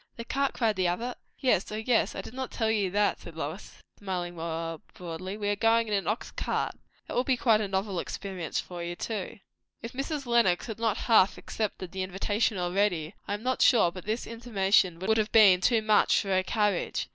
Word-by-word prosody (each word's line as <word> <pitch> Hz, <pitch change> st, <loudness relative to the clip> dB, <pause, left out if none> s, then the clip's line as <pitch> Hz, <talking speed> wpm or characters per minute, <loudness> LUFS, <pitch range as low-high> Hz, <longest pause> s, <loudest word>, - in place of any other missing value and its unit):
"The 230 Hz, -, -7 dB
cart!" 275 Hz, +2 st, 0 dB
cried 220 Hz, -4 st, 0 dB
the 185 Hz, -1 st, +2 dB
other. 235 Hz, +8 st, -2 dB, 0.2 s
"Yes. 250 Hz, -9 st, +1 dB
O -, -, -3 dB
yes! 225 Hz, +2 st, +1 dB
I -, -, -3 dB
did -, -, -11 dB
not 260 Hz, 0 st, -4 dB
tell 220 Hz, -2 st, 0 dB
you 205 Hz, -4 st, +1 dB
that," 205 Hz, +2 st, +1 dB
said 165 Hz, -, -11 dB
Lois, 160 Hz, +5 st, -6 dB, 0.2 s
smiling 180 Hz, -3 st, -4 dB
more 165 Hz, -1 st, -4 dB
broadly. 180 Hz, +3 st, -6 dB
"We 205 Hz, -1 st, -3 dB
are 205 Hz, -, +1 dB
going 225 Hz, +2 st, +3 dB
in 210 Hz, -, -2 dB
an 200 Hz, -1 st, 0 dB
ox 215 Hz, +3 st, -2 dB
cart. -, -, -2 dB, 0.3 s
That -, -, -7 dB
will 245 Hz, -, +2 dB
be 260 Hz, -1 st, +1 dB
a 215 Hz, -3 st, +4 dB
novel 190 Hz, -1 st, -2 dB
experience 185 Hz, -4 st, -4 dB
for 175 Hz, -1 st, -6 dB
you 175 Hz, 0 st, -4 dB
too." 205 Hz, 0 st, -4 dB, 0.5 s
If 230 Hz, -, -6 dB
Mrs. 275 Hz, +2 st, -3 dB
Lenox 235 Hz, -7 st, +3 dB
had 225 Hz, -2 st, -6 dB
not 225 Hz, -3 st, +1 dB
half 215 Hz, -5 st, +5 dB
accepted 200 Hz, -5 st, -4 dB
the 190 Hz, -, -4 dB
invitation 200 Hz, +3 st, 0 dB
already, 180 Hz, -2 st, 0 dB
I 205 Hz, -, -1 dB
am 210 Hz, -, -9 dB
not 255 Hz, +1 st, 0 dB
sure 220 Hz, -9 st, +5 dB
but 185 Hz, 0 st, -10 dB
this 220 Hz, +3 st, -2 dB
intimation 200 Hz, -6 st, +1 dB
would 205 Hz, +5 st, +1 dB
have 215 Hz, -1 st, 0 dB
been 200 Hz, -5 st, +7 dB
too 225 Hz, +1 st, +3 dB
much 215 Hz, -1 st, +4 dB
for 200 Hz, -, -4 dB
her 185 Hz, -1 st, +3 dB
courage. 205 Hz, -1 st, 0 dB
205 Hz, 210 wpm, -28 LUFS, 185-225 Hz, 0.5 s, been